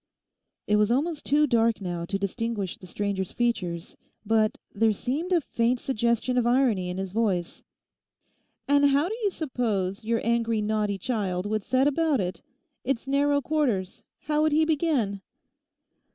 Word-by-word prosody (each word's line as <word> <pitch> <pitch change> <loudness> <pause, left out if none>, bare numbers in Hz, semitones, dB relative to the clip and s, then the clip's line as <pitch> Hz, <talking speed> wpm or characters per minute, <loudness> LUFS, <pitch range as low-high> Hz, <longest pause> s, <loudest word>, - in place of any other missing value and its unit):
It 210 - +2
was 210 0 +3
almost 300 +5 0
too 295 +2 +4
dark 230 -4 +2
now 175 -3 -4
to 195 - -2
distinguish 200 -1 -3
the 185 - -13
stranger's 195 0 -2
features 185 -9 -2 0.3
but 220 0 +2 0.2
there 220 +1 +3
seemed 290 - -3
a 355 - +5
faint 240 -1 0
suggestion 235 0 0
of 240 - +1
irony 240 -8 +2
in 180 - -4
his 190 -1 -4
voice. 195 -5 -1 1.1
'And 285 0 +4
how 280 +3 +3
do 440 - -3
you 415 - +2
suppose 220 - -2
your 230 +1 0
angry 230 -1 +1
naughty 210 -1 0
child 195 -4 -2
would 215 0 -1
set 260 +5 +2
about 305 -1 +2
it? 180 -1 -3 0.4
It's 265 0 -2
narrow 285 +1 +2
quarters; 245 -11 -1 0.2
how 300 0 0
would 310 -1 +2
he 315 +1 +4
begin? 285 - 0
230 Hz, 155 wpm, -26 LUFS, 200-280 Hz, 1.1 s, a